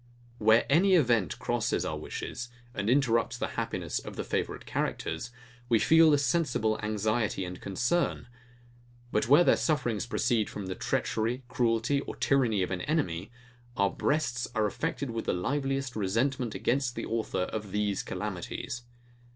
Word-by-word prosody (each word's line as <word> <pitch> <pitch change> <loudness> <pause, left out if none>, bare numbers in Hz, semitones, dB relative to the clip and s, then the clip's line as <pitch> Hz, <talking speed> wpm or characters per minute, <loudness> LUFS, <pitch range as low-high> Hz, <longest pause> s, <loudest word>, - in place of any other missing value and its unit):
Where 110 +1 +5
any 185 +7 +5
event 120 - +2
crosses - - 0
our - - -2
wishes, 120 +1 -5 0.2
and 100 -1 -2
interrupts 120 -3 +2
the - - -2
happiness - - -2
of - - -9
the - - -3
favourite - - -3
characters, 80 +9 -2 0.4
we 115 - +5
feel 160 +6 +6
a 145 - +5
sensible 130 -6 +1
anxiety 110 -1 0
and 90 0 -7
concern. 125 - 0 0.9
But 105 - +1
where 145 +7 +7
their - - +5
sufferings 120 -9 0
proceed 120 -4 +1
from 100 - -6
the 95 - -3
treachery, 115 +7 -1
cruelty, 120 +3 +1
or - - -7
tyranny 120 -8 +2
of 90 - -3
an 90 - -2
enemy, 135 - -1 0.5
our 100 0 +3
breasts 145 -5 0
are 110 -1 +2
affected 120 +5 -2
with 115 0 -4
the - - +1
liveliest 135 +5 -1
resentment 115 +4 0
against 125 -1 0
the - - -3
author 110 -5 -1
of 105 +1 -5
these 105 -1 0
calamities. 120 - -5
115 Hz, 150 wpm, -29 LUFS, 105-135 Hz, 0.9 s, where